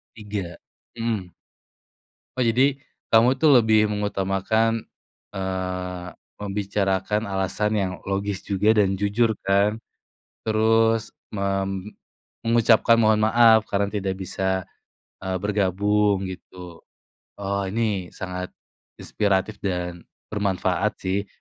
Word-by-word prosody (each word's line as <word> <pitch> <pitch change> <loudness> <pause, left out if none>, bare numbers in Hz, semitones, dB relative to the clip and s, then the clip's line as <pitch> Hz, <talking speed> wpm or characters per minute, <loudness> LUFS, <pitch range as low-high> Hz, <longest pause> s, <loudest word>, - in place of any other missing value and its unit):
Tiga, 100 -5 -5 0.4
mhm. 115 -6 -2 1.1
Oh, 130 - +2
jadi 130 +4 +3 0.4
kamu 125 +4 +5
itu 155 - +4
lebih 110 -6 +6
mengutamakan, 105 +2 0 0.5
eee, 90 -1 -4 0.3
membicarakan 100 0 -1
alasan 95 +1 -1
yang 95 -2 -1
logis 100 0 -2
juga, 105 +3 +2
dan 95 -3 +2
jujur, 105 +2 +1
kan? 100 +3 +1 0.7
Terus 110 +1 +2 0.2
mem 95 0 -2 0.6
mengucapkan 115 0 +5
mohon 110 0 +4
maaf 110 0 +5
karena 100 0 0
tidak 100 -2 -2
bisa, 95 0 -2 0.6
eee, 95 0 -1
bergabung, 100 0 +1
gitu? 90 -2 -11 0.5
Oh, 100 0 -2
ini 100 -3 -2
sangat 90 -1 -6 0.4
inspiratif, 100 0 -1
dan 90 -2 -4 0.2
bermanfaat 100 0 0
sih 100 +2 -1
100 Hz, 100 wpm, -24 LUFS, 95-110 Hz, 1.1 s, lebih